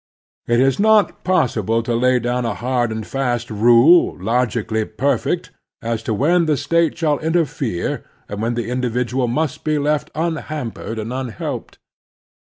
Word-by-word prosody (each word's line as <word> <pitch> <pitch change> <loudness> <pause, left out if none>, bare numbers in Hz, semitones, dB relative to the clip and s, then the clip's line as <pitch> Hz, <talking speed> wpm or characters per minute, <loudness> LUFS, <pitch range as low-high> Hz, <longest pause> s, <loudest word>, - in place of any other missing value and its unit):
It 120 0 +2
is 135 +4 +2
not 215 -2 +3
possible 115 - +1
to 120 - -2
lay 125 +2 +3
down 125 +1 -1
a 115 -3 -2
hard 120 -1 -1
and 110 -1 -4
fast 125 -3 -2
rule, 120 +10 +5
logically 110 +1 0
perfect, 125 +4 -1 0.3
as 115 -1 -3
to - - +2
when 165 - +2
the 150 -2 +2
State 165 +4 +1
shall 155 -3 +1
interfere, 150 - -1 0.2
and 105 +1 -5
when 115 +1 -1
the 120 0 -3
individual 125 0 -1
must 150 +4 -2
be 155 -1 +1
left 150 +1 -1
tmhampered 155 -8 -4
and 110 +2 -5
tmhelped. 125 -5 -5
125 Hz, 150 wpm, -20 LUFS, 115-150 Hz, 0.3 s, rule